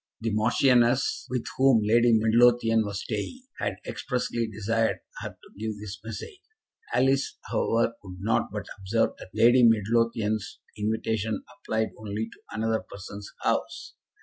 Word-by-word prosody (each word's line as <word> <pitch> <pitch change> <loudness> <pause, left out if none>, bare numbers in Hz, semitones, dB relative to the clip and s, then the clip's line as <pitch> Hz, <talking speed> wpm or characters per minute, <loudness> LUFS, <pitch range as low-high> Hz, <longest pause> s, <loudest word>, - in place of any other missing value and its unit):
The 115 0 -2
Marchioness, 120 +3 +3
with 125 -2 -2
whom 135 -4 +5
Lady 120 +3 +4
Midlothian 115 0 +4
was 100 -1 -4
staying, 120 - -4 0.2
had - - -1
expressly 120 -3 -2
desired 110 +1 0 0.2
her - - -4
to - - -18
give 110 -1 -3
this 105 -1 -7
message. 115 - -7 0.5
Alice, 135 +2 +2
however, 115 0 +1
could 90 -2 -10
not 110 +4 +1
but - - -4
observe 100 +4 +1
that - - -10
Lady 120 +3 +6
Midlothian's 115 -1 +2 0.2
invitation 110 0 -1
applied 110 0 -1
only 110 +1 -4
to - - -21
another 110 0 0
person's 100 0 -9
house. - - -1
110 Hz, 135 wpm, -27 LUFS, 105-120 Hz, 0.5 s, Lady